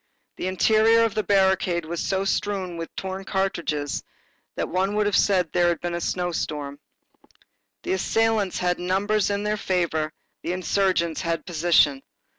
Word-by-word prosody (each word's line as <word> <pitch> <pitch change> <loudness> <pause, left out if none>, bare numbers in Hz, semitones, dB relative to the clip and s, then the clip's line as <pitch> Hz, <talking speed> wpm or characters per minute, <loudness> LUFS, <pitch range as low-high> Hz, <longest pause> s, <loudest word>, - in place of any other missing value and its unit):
The - - -3
interior 220 +4 +4
of 225 -3 +1
the 215 - 0
barricade 190 -4 +2
was 170 +1 -4
so 195 0 0
strewn 195 -2 -1
with 165 0 -5
torn 190 0 -5
cartridges 170 -7 -2 0.5
that - - -2
one 190 +3 0
would 210 0 +2
have 205 -1 +1
said 190 -3 +3
that 160 - -34
there 175 -1 +3
had 170 -1 +1
been 175 0 -3
a 170 - -3
snowstorm. 150 -6 -3 1.0
The 360 - -1
assailants 225 - +1
had 180 0 0
numbers 195 +3 +1
in 200 0 -1
their 210 0 0
favor; 170 -5 -1 0.3
the 175 - -2
insurgents 185 -2 0
had 165 -2 -2
position. 160 -5 +3
185 Hz, 160 wpm, -24 LUFS, 170-200 Hz, 1.0 s, interior